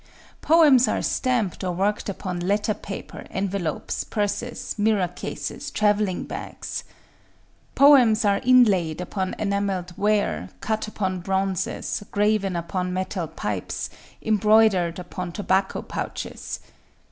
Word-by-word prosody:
Poems 295 -7 +6
are - - 0
stamped 235 -8 0
or 180 -1 -1
worked 200 +4 0
upon 185 -2 -4
letter 205 +4 +1
paper, 200 -1 -8
envelopes, 190 -5 -2
purses, 220 +3 -3
mirror 205 -3 +2
cases, 180 - -6
travelling 210 -3 +1
bags. - - -6 0.9
Poems 250 -6 +6
are 200 -1 +3
inlaid 205 -11 +4
upon 185 +1 -3
enamelled 200 -3 -1
ware, 210 0 +1
cut 220 0 -2
upon 190 -3 -2
bronzes, 190 +1 -1
graven 205 -2 +1
upon 180 +2 -2
metal 185 -1 -2
pipes, 160 - -4 0.3
embroidered 210 -5 +4
upon 180 0 -6
tobacco 190 0 0
pouches. - - -5
200 Hz, 110 wpm, -24 LUFS, 185-215 Hz, 0.9 s, Poems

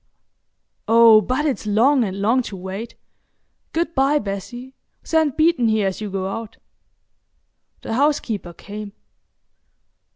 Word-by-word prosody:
Oh, 225 -1 +7
but 255 +8 -1
it's 265 -7 -2
long 245 +6 +3
and 195 -2 -4
long 230 +5 +2
to 200 - -8
wait! 190 +5 -7 0.8
Good 335 +1 -2
bye, 275 +1 +2
Bessie,—send 255 - -4
Beeton 315 -6 +3
here 220 -2 +1
as 190 +2 -3
you 210 - -4
go 190 -1 -3
out." 225 +2 -6 1.3
The - - -4
housekeeper 235 - -1
came. 205 +3 -9
225 Hz, 120 wpm, -21 LUFS, 200-270 Hz, 1.3 s, Oh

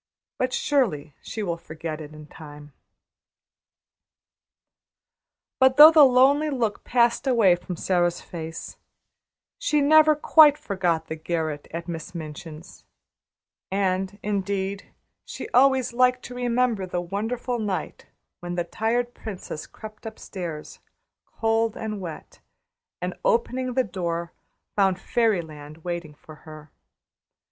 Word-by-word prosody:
But, 255 0 0
surely, 200 - 0
she 220 - -5
will 170 -3 -2
forget 160 -1 -7
it 150 -1 -9
in 155 0 -11
time." 145 -1 -13 2.9
But 260 0 +4
though 305 +2 +11
the 315 -2 +7
lonely 275 +4 +5
look 235 -7 -2
passed 240 +2 +2
away 225 -8 +5
from 180 +1 -7
Sara's 175 0 0
face, 165 -1 -8 0.8
she 300 -2 +1
never 310 +1 +6
quite 300 0 +6
forgot 185 - -1
the 160 - -5
garret 160 -2 -3
at 170 0 -6
Miss 170 +1 -7
Minchin's; 160 +1 -9 0.9
and, 190 0 -1
indeed, 200 -1 -3 0.3
she - - -7
always 260 -1 +3
liked 250 +1 +2
to 250 - -8
remember 245 -5 0
the 180 -1 -2
wonderful 225 +7 -3
night 205 -4 -4 0.3
when 175 0 -5
the 175 - 0
tired 235 +7 -1
princess 190 -7 -7
crept 215 +1 -11
upstairs, 175 -8 -7 0.5
cold 225 0 0
and 215 -2 -5
wet, 165 -4 -9 0.6
and - - -2
opening 260 - 0
the 260 - +3
door 170 -4 -4 0.4
found 195 -2 +2
fairy 220 -5 +1
land 155 0 -12
waiting 170 -4 -5
for 155 +1 -14
her. 155 -2 -13
195 Hz, 120 wpm, -24 LUFS, 170-245 Hz, 2.9 s, though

